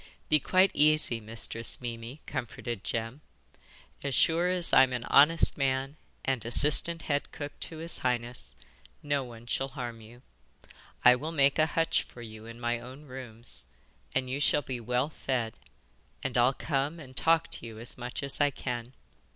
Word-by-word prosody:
'Be 155 - +5
quite 185 +6 +3
easy, 150 -6 +3
Mistress 115 +1 -2
Mimi,' 120 +3 -7
comforted 120 -2 -5
Jem. 115 +5 -3 0.8
'As 140 -2 -1
sure 165 +8 +3
as 180 -2 +2
I'm 130 -1 +6
an 120 -2 -3
honest 150 +2 +5
man 135 +1 0 0.3
and 130 -4 0
assistant 150 +7 +6
head 145 -1 -2
cook 145 -1 -8
to 160 - -6
his 165 +1 -3
highness, 120 -1 -2 0.5
no 145 -2 0
one 120 -2 -11
shall 135 +2 -1
harm 120 -4 -7
you. 120 +3 -15 0.8
I 125 0 +9
will 150 +6 -5
make 140 -2 +3
a 155 - +4
hutch 165 0 +3
for 120 - -12
you 110 0 -10
in 115 +1 -10
my 120 0 -1
own 130 +4 -11
rooms, 120 - -7 0.5
and 130 - +1
you 130 +2 -3
shall 145 0 +3
be 125 -1 -5
well 125 +4 -1
fed, 125 -7 -2 0.7
and 130 - -3
I'll 125 +2 +4
come 145 +2 -2
and 130 -4 -12
talk 165 +5 +2
to 115 - -6
you 110 -1 -10
as 115 +2 -1
much 125 +3 -6
as 140 +1 -2
I 145 - +4
can. 125 -2 -5
130 Hz, 170 wpm, -29 LUFS, 120-145 Hz, 0.8 s, I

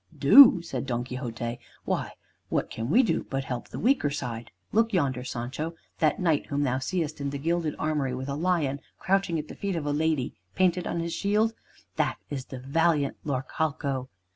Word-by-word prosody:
"Do!" 235 -11 +9
said 135 -5 -4
Don 120 -1 -1
Quixote, 120 -2 -5 0.3
"why, - - -1 0.4
what - - -1
can 115 +2 -4
we 245 - +5
do 230 - 0
but 135 0 -1
help 125 -2 -5
the - - -8
weaker 245 - +2
side? 120 -5 -5 0.2
Look 225 +1 +2
yonder, 135 -8 +1
Sancho, 130 +7 -4 0.2
that 155 -2 +2
knight 165 -6 +1
whom 145 0 0
thou 130 -1 +1
seest 155 +1 -2
in 140 - -1
the 140 - -4
gilded 165 +1 -1
armory 145 -5 -1
with 130 +1 -5
a 140 - -2
lion 155 -3 0 0.2
crouching 195 -3 +1
at 155 0 -4
the - - -8
feet 200 -2 -2
of 160 -3 -3
a 145 - 0
lady 155 -3 0 0.2
painted 180 -1 +2
on 170 - -1
his 165 0 -3
shield, 210 +4 +1 0.4
that - - +1
is 135 -3 -4
the 130 - -8
valiant 145 +2 +1
Laurcalco. 140 -1 -2
145 Hz, 190 wpm, -27 LUFS, 130-170 Hz, 0.4 s, Do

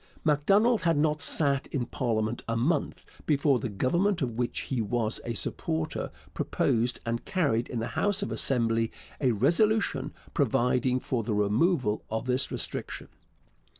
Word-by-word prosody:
Macdonald 195 +10 +3
had 165 -3 +2
not 150 0 +1
sat 140 -3 +2
in 125 -4 -2
parliament 115 -3 -1
a 115 0 -1
month 135 +9 -1 0.2
before 140 -3 +3
the 115 - -3
Government 170 - +1
of 125 - -1
which 120 +1 -2
he 130 -4 -2
was 110 +1 -1
a 115 - -3
supporter 80 -5 -3 0.2
proposed 120 +2 0
and 115 0 -2
carried 140 -11 0
in 120 - -5
the 115 - -2
House 205 -1 +1
of - - -4
Assembly 115 -1 +1 0.3
a 130 - +2
resolution 150 - +2 0.2
providing 125 0 +2
for 125 -2 -2
the 105 -1 -2
removal 105 - +1
of 110 +2 -3
this 130 +1 +1
restriction. - - -3
125 Hz, 150 wpm, -28 LUFS, 115-150 Hz, 0.3 s, Macdonald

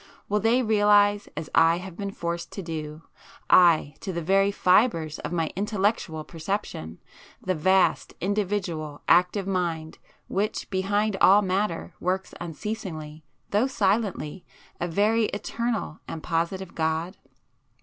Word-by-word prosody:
Will 210 +1 +1
they 235 +4 +3
realize 205 -2 +4
as 155 - -4
I 165 +1 +5
have 180 -1 -8
been 200 +1 -4
forced 170 -3 -4
to 195 - -5
do,—aye, 160 0 +1
to 195 - -5
the 170 -2 -4
very 195 +3 +3
fibres 180 -5 +2
of - - -5
my 165 -2 -1
intellectual 200 -5 -1
perception,—the 165 - -5
vast, 185 +3 +2
individual, 185 -7 -2
active 180 +2 +3
Mind, 170 -4 -2 0.3
which 205 +3 -2
behind 200 +2 0
all 200 +2 +7
matter, 190 -2 -1
works 185 +1 -2
unceasingly, 160 -3 -6 0.3
though 210 +6 +3
silently, 195 - -1 0.4
a 175 - -1
very 215 +6 +2
eternal 230 -5 -3
and 160 - -6
positive 170 +2 -2
God? 160 +3 -1
185 Hz, 120 wpm, -26 LUFS, 165-205 Hz, 0.4 s, all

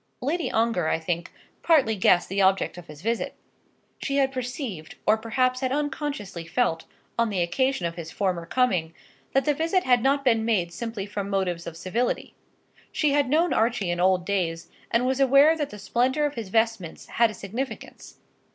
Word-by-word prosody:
Lady 310 +6 -1
Ongar, 225 -7 +1
I - - +2
think, 170 +1 -3 0.3
partly 275 -10 +4
guessed 180 -2 +3
the 195 +1 0
object 190 0 +2
of 175 - -13
his 150 +2 -12
visit. 230 +1 -1 0.7
She 280 -1 -1
had 270 -1 +3
perceived, 245 - -5
or 215 - +5
perhaps 255 +3 0
had 260 -1 -1
unconsciously 280 - -3
felt, 200 -2 0 0.3
on 230 -1 +3
the 190 -4 0
occasion 225 +4 0
of 170 - -2
his 170 -1 -7
former 180 -3 -2
coming, 180 -11 +1 0.4
that 270 - +2
the 295 - +3
visit 330 +5 +1
had 245 -2 +3
not 275 +2 +1
been 225 -3 +3
made 190 -7 0
simply 225 -1 -4
from 200 -1 -4
motives 180 -4 -1
of 165 -1 -7
civility. 225 +9 -2 0.6
She 300 -2 +1
had 285 -2 +2
known 325 +4 +3
Archie 225 -5 +1
in 175 - -2
old 180 0 +3
days, 175 -4 -2 0.2
and 235 +2 +2
was 260 +1 0
aware 275 +4 +6
that 295 -3 -2
the 210 - -9
splendour 255 +8 +1
of 290 - -1
his 225 -7 -6
vestments 225 -5 -1
had 235 -1 +2
a 215 - -8
significance. 235 +7 -6
225 Hz, 185 wpm, -25 LUFS, 185-265 Hz, 0.7 s, aware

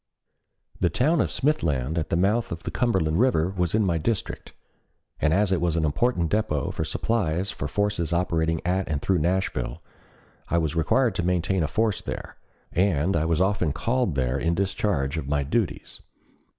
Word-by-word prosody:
The 90 - +2
town 150 - +2
of - - 0
Smithland 80 - 0
at 80 -3 -2
the - - +1
mouth 105 +7 +1
of 85 0 -5
the - - -4
Cumberland 95 -9 +1
River 95 -9 +2
was 90 +1 0
in 110 -1 +3
my 85 -3 +1
district, 105 +5 -3 0.7
and 80 - +2
as 100 +3 +2
it 95 - +1
was 85 -2 +1
an 80 - +1
important 85 +2 0
dépôt 105 -10 0
for - - -2
supplies 95 +1 -1
for - - -5
the 70 - -5
forces 100 -5 0
operating 80 -2 0
at 95 +2 0
and 75 -3 0
through 95 +3 +1
Nashville, 85 -4 -1 0.7
I 85 - +2
was 80 -1 0
required 110 +9 +2
to - - 0
maintain 90 +1 +1
a 80 - +1
force 110 +3 0
there, - - -7 0.3
and 90 -1 +1
I 80 -1 +1
was 80 -1 +1
often 95 -6 +1
called 120 - 0
there 65 0 0
in 85 +4 0
discharge 95 -6 -1
of 70 - -6
my 70 0 +1
duties. 95 - -2
85 Hz, 185 wpm, -25 LUFS, 80-100 Hz, 0.7 s, in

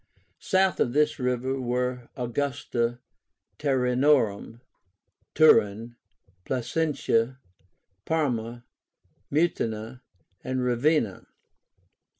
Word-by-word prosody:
South 190 0 +1
of 120 - +1
this 150 +1 +2
river 125 +1 -1
were 125 0 -2
Augusta 120 -1 -2 0.6
Taurinórum 125 -5 +1 0.8
(Turin), 115 -6 +4 0.5
Placentia, 130 - 0 0.7
Parma, 120 -7 -2 0.7
Mutina, 125 -7 -1 0.4
and 130 0 -2
Ravenna. 125 - +1
125 Hz, 65 wpm, -26 LUFS, 120-145 Hz, 0.8 s, Turin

